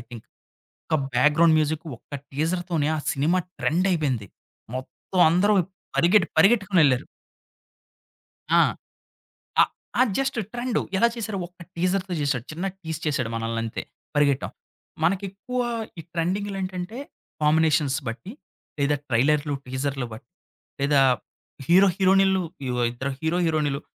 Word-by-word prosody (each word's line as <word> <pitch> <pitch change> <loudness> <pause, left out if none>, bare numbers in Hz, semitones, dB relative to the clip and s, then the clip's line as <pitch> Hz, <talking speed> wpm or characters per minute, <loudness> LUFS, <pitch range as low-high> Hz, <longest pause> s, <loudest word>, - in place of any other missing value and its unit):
Think. 115 -3 -10 0.6
ఒక 155 - +2 0.2
background 150 +5 +5
music 155 +1 -1
ఒక 145 - -9 0.2
టీజర్‌తోనే 165 +1 -1
ఆ - - -2
సినిమా 160 +7 +1 0.2
ట్రెండ్ 180 +5 +1
అయిపోయింది. 135 - 0 0.5
మొత్తం 135 +7 -3
అందరూ 200 +5 +4 0.4
పరిగెట్టి 175 +1 +4
పరిగెట్టుకొని 195 0 +4
వెళ్లారు. 130 -1 +3 1.5
ఆ! - - +7 1.0
అ! - - +1 0.2
జస్ట్ 270 -2 -1
ట్రెండ్ 240 -1 -1 0.2
ఎలా 235 - +5
చేసారు? 220 -3 -3
ఒక 180 0 -15
టీజర్‌తో 185 +2 0
చేసాడు. 135 -4 0
చిన్న 170 +5 -3
టీజ్ 160 -3 -5
చేసాడు 130 -6 0
మనల్ని 115 0 -2
అంతే. 115 - -4 0.3
పరిగెట్టాం. 145 -2 +2 0.5
మనకు 190 +4 +2
ఎక్కువ 250 +6 -4 0.4
ఈ - - -8
ట్రెండింగ్‌లు 195 +4 -1
ఏంటంటే, 185 +5 -5 0.4
కాంబినేషన్స్ 150 -2 +3
బట్టి 130 - -6 0.5
లేదా 145 +1 +2
ట్రైలర్‌లు, 145 +4 +2
టీజర్‌లు 130 0 -2
బట్టి 110 +5 -11 0.5
లేదా 140 0 +3 0.7
హీరో 190 +5 +6
హీరోయిన్‌లు 190 0 +4 0.5
ఇద్దరు 135 +3 -4
హీరో 160 +2 0
హీరోయిన్‌లు 150 -3 0
160 Hz, 120 wpm, -25 LUFS, 140-190 Hz, 1.5 s, ఆ